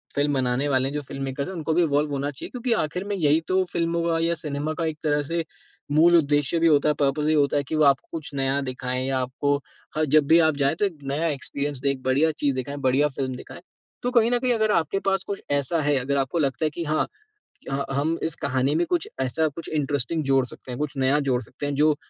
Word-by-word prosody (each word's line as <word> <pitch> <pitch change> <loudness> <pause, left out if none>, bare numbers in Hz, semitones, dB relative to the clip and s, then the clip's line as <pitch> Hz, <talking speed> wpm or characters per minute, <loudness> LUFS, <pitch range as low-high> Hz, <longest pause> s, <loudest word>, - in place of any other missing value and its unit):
Film 145 0 +1
बनाने 130 +1 0
वाले 130 -1 +2
हैं, - - -7
जो 150 - -1
फ़िल्म 135 0 -7
मेकर्स 135 +1 -3
हैं 190 - -6
उनको 160 -1 -1
भी 175 - +3
इवॉल्व 145 -1 +1
होना 140 +1 -2
चाहिए। 135 - -8
क्योंकि 250 0 -3
आख़िर 165 +5 -4
में 205 - -1
यही 155 -4 +3
तो 185 0 +2
फ़िल्मों 170 0 0
का 165 -1 +1
या 165 +1 +1
सिनेमा 150 +1 -2
का - - +1
एक 160 -1 -2
तरह 150 -1 +2
से 170 0 0 0.5
मूल 165 +4 +6
उद्देश्य 145 +1 +1
भी 165 - +4
होता 150 -1 +4
है। - - +3
पर्पस 145 +1 +1
यहीं 155 +1 +3
होता 145 -1 +2
है 145 - +1
की 140 - -4
वो 155 - +3
आपको 140 -1 +3
कुछ 155 -3 -6
नया 135 0 +1
दिखाएँ 130 -1 -3
या 135 -1 0
आपको 135 +3 0 0.4
ह 155 - +2
जब 150 0 +3
भी 165 +3 +6
आप 160 -2 +3
जाएँ 140 +2 +2
तो 205 - +1
एक 185 -6 -3
नया 140 +4 -1
एक्सपीरियंस, 140 -1 -3
एक 140 -1 0
बढ़िया 140 +5 +3
चीज़ 145 -3 -1
दिखाएँ, 130 +3 -4
बढ़िया 135 +2 +3
फ़िल्म 130 -2 -4
दिखाएँ। 125 - -10 0.4
तो 245 - +1
कहीं 235 -2 +4
न 245 - +4
कहीं 250 0 +2
अगर 220 -2 +2
आपके 170 +3 +1
पास 195 -1 +1
कुछ 200 - -5
ऐसा 145 +3 +1
है 145 -1 +2
अगर 140 +2 -1
आपको 135 +5 0
लगता 140 0 0
है - - +2
कि 170 - -3
हाँ, 155 0 0 0.6
ह 135 - -1 0.2
हम 155 +4 0
इस 160 - 0
कहानी 135 -1 0
में 170 +2 +2
कुछ 175 -2 0
ऐसा 145 +5 +1
कुछ 155 +2 -6
इंटरेस्टिंग 145 +1 -1
जोड़ 135 -2 +3
सकते 125 +1 -8
हैं, 120 - -5
कुछ 150 -2 -2
नया 135 +2 +3
जोड़ 130 -4 0
सकते 120 - -7
हैं 145 - -1
जो 150 +1 +4
145 Hz, 255 wpm, -24 LUFS, 135-160 Hz, 0.6 s, मूल